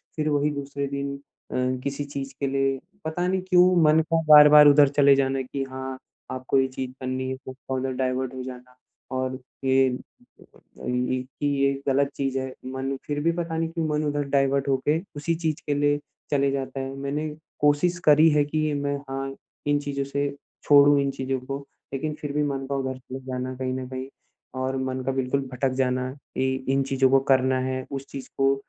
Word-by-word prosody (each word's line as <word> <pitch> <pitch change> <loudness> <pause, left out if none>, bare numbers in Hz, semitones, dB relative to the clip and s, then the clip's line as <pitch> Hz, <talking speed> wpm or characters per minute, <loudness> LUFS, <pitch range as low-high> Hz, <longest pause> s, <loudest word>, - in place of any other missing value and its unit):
फ़िर 155 -1 0
वही 145 0 +2
दूसरे 140 -1 -4
दिन 140 0 -3 0.4
अ, - - -4 0.3
किसी 140 +1 -2
चीज़ 140 -1 -6
के 140 - 0
लिए 135 0 0 0.3
पता 175 +3 -1
नहीं 190 0 0
क्यों 180 0 +6
मन 155 +1 +5
का 165 +1 0
बार-बार 150 -1 +9
उधर 145 0 +7
चले 140 -1 +7
जाना 135 0 +1
है 130 - -2
कि 135 +2 -4
हाँ, 130 0 -5 0.3
आपको 130 +1 0
ये 130 - +2
चीज़ 130 -1 -5
करनी 130 0 -2
है 130 - -3 0.3
उधर 130 0 -1
डाइवर्ट 130 0 -1
हो 130 -1 -5
जाना, 125 0 -10 0.4
और 130 0 -2 0.2
ये 135 0 +4
ये 125 0 -5
कि 135 +3 -4 0.2
ये 140 0 +3
गलत 140 +1 +2
चीज़ 135 -1 -1
है, 130 0 -5
मन 130 +1 -3
फ़िर 145 0 -1
भी 170 - +3
पता 170 -1 -3
नहीं 165 0 0
क्यों 165 -1 -2
मन 150 0 0
उधर 145 0 0
डाइवर्ट 140 0 +2
होके, 140 +4 +1 0.2
उसी 160 +3 -1
चीज़ 160 -2 -2
के 145 - +2
लिए 145 0 +2 0.3
चले 140 -1 +2
जाता 135 0 -3
है। 135 0 -4
मैंने 140 +3 -3 0.3
कोशिश 150 +5 +3
करी 155 +2 +7
है 145 -1 +4
कि 155 +1 -1
मैं 145 0 -1
हाँ, 135 0 -4 0.3
इन 145 0 +3
चीज़ों 140 -1 -3
से 140 +1 -1 0.3
छोड़ूँ 145 0 +6
इन 140 0 0
चीज़ों 130 0 -2
को, 135 +2 -5 0.3
लेकिन 150 +3 -2
फ़िर 145 -1 -3
भी 150 0 +1
मन 135 -2 -2
का 140 - -1
उधर 130 -1 -2
चले 130 +1 -8
जाना 130 0 -3
कहीं 130 0 -3
न 130 -1 -4
कहीं 130 0 -5 0.5
और 130 +1 -1
मन 130 0 -2
का 135 - +1
बिल्कुल 130 +1 0
भटक 130 +1 0
जाना 125 0 0 0.3
इ 130 0 +1 0.2
इन 135 - +2
चीज़ों 135 -1 +2
को 135 +1 +5
करना 130 0 +3
है, 130 0 -2
उस 135 0 -4
चीज़ 135 -1 -7
को 135 0 +3
135 Hz, 200 wpm, -25 LUFS, 130-145 Hz, 0.5 s, बार-बार